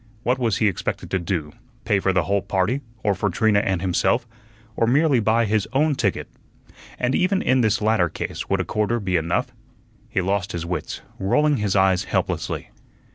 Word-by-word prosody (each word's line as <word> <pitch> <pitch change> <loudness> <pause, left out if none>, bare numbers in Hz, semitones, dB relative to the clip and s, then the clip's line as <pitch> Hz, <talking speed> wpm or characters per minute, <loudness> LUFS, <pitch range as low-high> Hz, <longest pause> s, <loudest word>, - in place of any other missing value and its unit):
What 125 +2 +1
was 115 -6 +1
he 110 - +2
expected 100 - -3
to 95 - +1
do 80 -4 -3 0.3
pay 100 -3 +2
for 95 - +1
the 90 -2 +2
whole 100 +5 0
party, 100 +7 0 0.2
or 105 - +2
for 100 +2 -1
Trina 105 +3 +2
and 95 -3 -1
himself, 90 -2 +1 0.5
or 115 - +1
merely 140 +1 +3
buy 115 +1 +2
his 105 -1 0
own 150 +3 +3
ticket? - - -1 0.7
And 125 +1 0
even 185 +4 +1
in 130 0 +3
this 110 -2 +1
latter 105 -5 +2
case - - -5
would - - +1
a - - -4
quarter 110 +3 0
be 95 -3 -1
enough? 85 0 0 0.6
He - - -1
lost 95 +1 -1
his 85 -1 -3
wits, 85 -3 -4 0.2
rolling 150 +9 +2
his 105 -3 -1
eyes 95 -2 +3
helplessly. - - -2
100 Hz, 185 wpm, -23 LUFS, 95-120 Hz, 0.7 s, merely